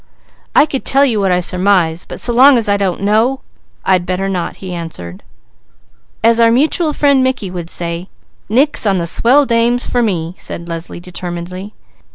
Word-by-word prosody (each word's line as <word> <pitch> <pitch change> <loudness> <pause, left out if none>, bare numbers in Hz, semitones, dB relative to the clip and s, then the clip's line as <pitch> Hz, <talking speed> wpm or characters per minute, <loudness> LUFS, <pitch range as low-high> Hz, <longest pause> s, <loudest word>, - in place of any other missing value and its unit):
"I - - +6
could 275 -3 -4
tell 275 +1 +3
you 230 -6 0
what 195 -2 +1
I 180 0 +2
surmise, 180 -2 +1
but - - -7
so 240 - +1
long 265 +2 +6
as 230 - +1
I 205 - +2
don't 195 -3 -2
know 225 +6 +1 0.4
I'd 185 -2 +2
better 185 +2 -2
not," 185 -3 -3
he 185 -2 -8
answered. 160 - -7 1.0
"As 230 +1 +4
our 230 0 +5
mutual 305 +6 +1
friend 280 -3 +2
Mickey 255 -8 -2
would 175 -2 -6
say, 170 +1 -3 0.4
'Nix 260 +1 +2
on 195 -2 +2
the 170 - -2
Swell 255 - +3
Dames,' 235 0 +1
for 245 - 0
me!" 175 -7 -2
said 170 - -6
Leslie 165 0 -6
determinedly. 180 +2 -7
195 Hz, 180 wpm, -15 LUFS, 175-245 Hz, 1.0 s, I